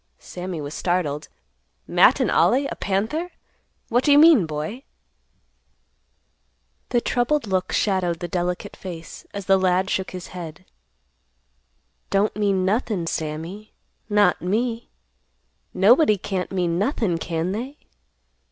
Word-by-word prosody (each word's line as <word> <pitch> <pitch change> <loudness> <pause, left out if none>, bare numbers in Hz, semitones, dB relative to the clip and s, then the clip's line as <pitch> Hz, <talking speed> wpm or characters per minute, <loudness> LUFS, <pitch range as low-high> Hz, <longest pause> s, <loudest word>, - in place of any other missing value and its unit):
Sammy 180 -2 -6
was 145 0 -6
startled. 165 -5 -1 0.6
"Matt - - +5
and - - +1
Ollie, 275 +3 +3
a - - -4
panther? 220 - -2 0.6
What 245 +1 +2
do 290 - +3
you 285 - +7
mean, 300 - +7
boy?" 155 - -5 2.1
The 240 - +2
troubled 250 +4 0
look 185 -2 -1
shadowed 185 -4 +1
the 175 - -4
delicate 180 -1 -3
face, 170 -3 -9
as 200 -2 -6
the 195 0 +4
lad 185 +1 +1
shook 190 0 -1
his 180 -1 -8
head; 175 0 -9 1.4
"Don't 200 +1 +1
mean 200 -3 +1
nothin', 205 -3 0
Sammy, 165 +7 -5 0.4
not 205 -3 +3
me. 230 +5 -1 0.8
Nobody 215 - +5
can't 190 -1 -4
mean 175 -2 0
nothin', 205 - 0
can 165 +2 -2
they?" 255 +8 -5
190 Hz, 125 wpm, -23 LUFS, 175-220 Hz, 2.1 s, you